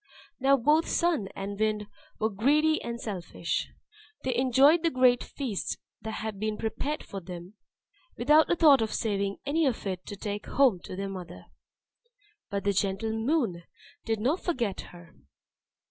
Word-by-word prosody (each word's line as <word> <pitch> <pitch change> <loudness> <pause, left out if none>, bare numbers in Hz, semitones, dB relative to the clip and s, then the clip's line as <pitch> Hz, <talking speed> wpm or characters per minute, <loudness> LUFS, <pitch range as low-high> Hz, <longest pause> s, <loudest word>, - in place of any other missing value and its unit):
Now 275 +1 +4
both 300 +6 +3
Sun 335 - +1
and 200 +1 -5
Wind 215 -1 0 0.3
were 220 +1 0
greedy 300 +9 +3
and 235 0 -5
selfish. 180 -5 -3 0.5
They 255 - 0
enjoyed 265 +6 +5
the 335 - +2
great 255 -3 +4
feast 245 -9 -4 0.2
that 220 +1 -5
had 215 -2 -5
been 215 0 -2
prepared 280 +7 -3
for 195 - -7
them, 175 +1 -9 0.6
without 300 +6 +5
a - - +3
thought 295 -6 +6
of 220 - -1
saving 200 -2 -1
any 305 +2 +2
of 245 -5 -2
it 185 -2 -4
to 205 - -5
take 205 +1 -5
home 260 -9 +3
to - - -7
their 195 +1 -3
mother 180 -3 -8 1.0
but 200 0 -2
the 200 - +2
gentle 195 +3 0
Moon 225 - 0 0.4
did 225 -1 -1
not 275 - +1
forget 240 - -1
her. 175 -1 -14
220 Hz, 160 wpm, -28 LUFS, 200-275 Hz, 1.0 s, thought